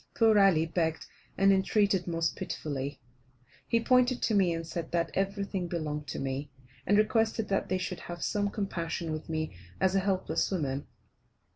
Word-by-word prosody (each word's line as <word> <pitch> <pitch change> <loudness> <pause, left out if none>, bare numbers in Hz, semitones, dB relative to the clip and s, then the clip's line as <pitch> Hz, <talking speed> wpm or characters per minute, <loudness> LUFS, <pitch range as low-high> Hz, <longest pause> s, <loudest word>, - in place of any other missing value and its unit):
Poor 220 -2 +5
Ali 185 -5 +5
begged 160 -1 -1 0.3
and 195 0 +5
entreated 195 -1 +2
most 165 -1 0
pitifully. 140 -2 -4 0.7
He 230 - +3
pointed 250 +1 +3
to 225 - +2
me, 190 -4 +4
and 165 0 -3
said 165 0 -5
that 170 -1 0
everything 195 -1 -1
belonged 150 -3 -3
to - - -4
me, 135 +2 -3 0.4
and 205 - +4
requested 220 +1 +2
that 195 - 0
they 185 - +1
should 185 -1 -4
have 175 -1 -7
some 205 -1 0
compassion 170 -5 -3
with 155 +1 -5
me 155 - -2 0.2
as 190 0 +3
a 195 - +4
helpless 190 -1 0
woman. 145 -7 -2
180 Hz, 165 wpm, -30 LUFS, 160-200 Hz, 0.7 s, Poor